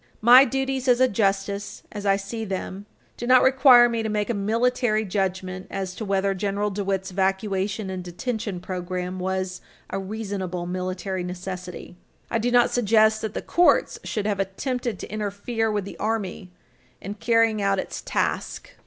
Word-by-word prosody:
My 250 +4 +9
duties 265 0 -2
as 245 -1 +4
a 260 - +5
justice, 200 -1 -1
as 205 -1 -5
I 195 - +5
see 200 +3 -5
them, 195 0 -5 0.3
do 240 - -5
not 255 0 +6
require 260 -2 +7
me 230 -1 -1
to 220 - -2
make 210 +1 -1
a - - 0
military 220 +1 +1
judgment 185 -1 -2
as 190 -2 -4
to 220 - -6
whether 195 -1 +1
General 205 +2 -1
DeWitt's 195 -1 -2
evacuation 195 +1 -1
and 185 -1 -5
detention 205 +2 -4
program 180 0 -4
was 185 0 -2 0.3
a - - -2
reasonable 195 -3 -4
military 185 +1 -3
necessity. 180 0 -7 0.3
I 230 - +1
do 235 +2 0
not 245 0 +4
suggest 220 -1 +3
that 220 -2 -4
the - - -3
courts 350 0 +3
should 210 -2 -3
have 205 -2 0
attempted 235 +3 -2
to - - -8
interfere 215 +2 -2
with 205 -2 -1
the - - -9
Army 205 -4 -2 0.5
in 200 - -6
carrying 230 0 +2
out 195 0 +2
its - - -4
task. - - -2
200 Hz, 165 wpm, -24 LUFS, 190-225 Hz, 0.5 s, My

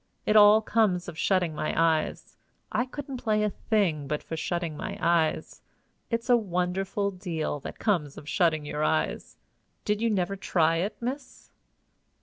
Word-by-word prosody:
It 210 - +2
all 210 +1 +7
comes 205 -6 +1
of 175 - -7
shutting 175 0 +1
my 155 - -2
eyes. 160 -1 0 0.4
I 250 - 0
couldn't 275 0 -6
play 215 -3 0
a 210 - +1
thing 175 -12 0
but 150 +1 -3
for 160 - -5
shutting 170 0 -3
my - - -5
eyes. 170 -2 0 0.5
It's 230 0 -2
a 245 - +6
wonderful 195 0 -1
deal 170 -5 -3
that - - -8
comes 165 -10 0
of 150 - -10
shutting 155 -3 +1
your 150 +1 -3
eyes! 155 0 -1 0.5
Did 210 0 0
you 230 - +2
never 195 -2 0
try 165 -4 +1
it, 195 +6 -3
miss?" 260 +3 -6
180 Hz, 160 wpm, -27 LUFS, 160-215 Hz, 0.5 s, all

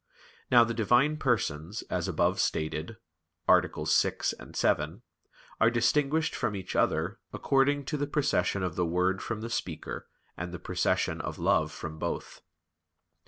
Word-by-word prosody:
Now 120 -2 +7
the 115 0 -2
Divine 120 +7 +3
Persons, 100 - -1
as - - -2
above - - +1
stated 80 +7 -1 0.5
(AA. - - +7 0.2
6, - - +2 0.2
7), 80 +8 0 0.6
are 115 - +5
distinguished 140 +6 +2
from 115 -5 -1
each 95 -2 -6
other 90 +8 +1
according 140 +1 +2
to 150 - -2
the 145 0 -1
procession 145 -9 +1
of 90 -3 -2
the 90 - +1
word 90 +3 +1
from 115 -2 -4
the 115 - -5
speaker, 85 -7 -4 0.3
and 85 +1 -5
the 90 - -5
procession - - 0
of - - -5
love - - +2
from 80 0 -7
both. 85 - -4
110 Hz, 145 wpm, -29 LUFS, 90-135 Hz, 0.6 s, Now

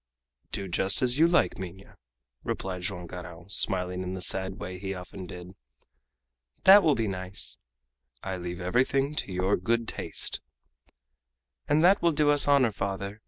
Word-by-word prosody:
"Do 100 - -3
just 95 +6 0
as 125 +2 +2
you 165 - +7
like, 170 -10 +2
Minha," 95 +1 -9 0.5
replied 95 -1 -3
Joam 90 -1 -5
Garral, 85 -1 -9
smiling 90 -2 0
in 90 0 -4
the - - -5
sad 95 +1 -1
way 90 0 -6
he 95 0 -4
often 90 0 -8
did. 90 +1 -9 1.1
"That 200 +2 +9
will 155 -5 +3
be 115 -1 0
nice!" 95 0 -5 0.6
"I 95 -1 -3
leave 90 0 -5
everything 130 +9 +1
to - - -2
your 95 +2 +1
good 115 +5 0
taste." - - -3 1.3
"And 150 +2 +4
that 195 +3 +5
will 170 -1 +3
do 145 0 +3
us 145 -1 +4
honor, 140 -5 +4
father. 100 +1 -4
95 Hz, 160 wpm, -28 LUFS, 90-130 Hz, 1.3 s, That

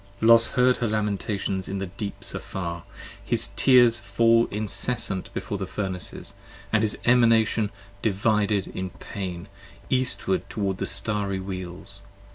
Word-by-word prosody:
Los 115 0 +6
heard 125 -1 +4
her 120 - 0
lamentations 105 -2 -1
in 100 - -2
the 95 - -2
deeps 100 +2 -6
afar! 85 -3 -5 0.4
his - - -1
tears 120 -3 +6
fall 115 +3 +3
Incessant 105 -1 -2
before 100 - -4
the 95 - -3
Furnaces, 95 -2 -4 0.4
and 110 - +4
his 110 -1 0
Emanation 115 -3 +4 0.3
divided 105 -1 +1
in 95 0 -4
pain, 90 -1 -6 0.4
68 130 - +4
Eastward 130 +8 -1
toward 100 -3 -2
the - - -1
Starry 100 -3 0
Wheels. 95 +1 -6
105 Hz, 130 wpm, -25 LUFS, 95-115 Hz, 0.4 s, Los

